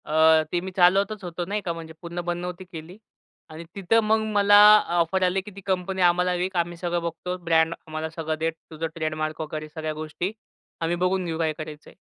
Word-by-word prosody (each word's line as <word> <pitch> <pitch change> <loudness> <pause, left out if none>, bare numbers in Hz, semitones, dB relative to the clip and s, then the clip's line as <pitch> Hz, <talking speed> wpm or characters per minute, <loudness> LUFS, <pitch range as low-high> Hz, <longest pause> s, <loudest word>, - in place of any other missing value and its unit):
अ, 160 0 +5
ते 175 - +1
मी 190 +1 -6
चालवतच 195 +3 +3
होतो 175 0 -4
नाही 205 +3 -2
का. 170 -3 -3
म्हणजे 165 -1 -9
पूर्ण 170 0 -5
बंद 175 0 -2
नव्हती 180 +1 -6
केली. 170 +1 -10 0.5
आणि 160 +1 -9
तिथं 200 +3 +2
मग 220 +1 +3
मला 205 0 +6 0.2
अ, 190 - -2
ऑफर 185 +3 +1
आली, 185 +1 +2
की 210 +2 -11
ती 200 - -9
कंपनी 190 0 -1
आम्हाला 180 +1 +3
विक. 180 +2 -2
आम्ही 170 0 -1
सगळं 175 0 -2
बघतो, 170 +2 -4
ब्रँड 165 -1 +3
आम्हाला 155 0 -4
सगळं 160 -1 -4
दे, 160 +1 +1 0.2
तुझं 160 +1 -3
ट्रेडमार्क 155 -1 -3
वगैरे 155 0 -5
सगळ्या 155 0 -4
गोष्टी. 155 +4 -4 0.5
आम्ही 165 +1 0
बघून 185 0 +1
घेऊ 165 -2 -3
काय 160 -1 +1
करायचं 155 -1 -8
आहे. - - -18
175 Hz, 210 wpm, -25 LUFS, 160-185 Hz, 0.5 s, मला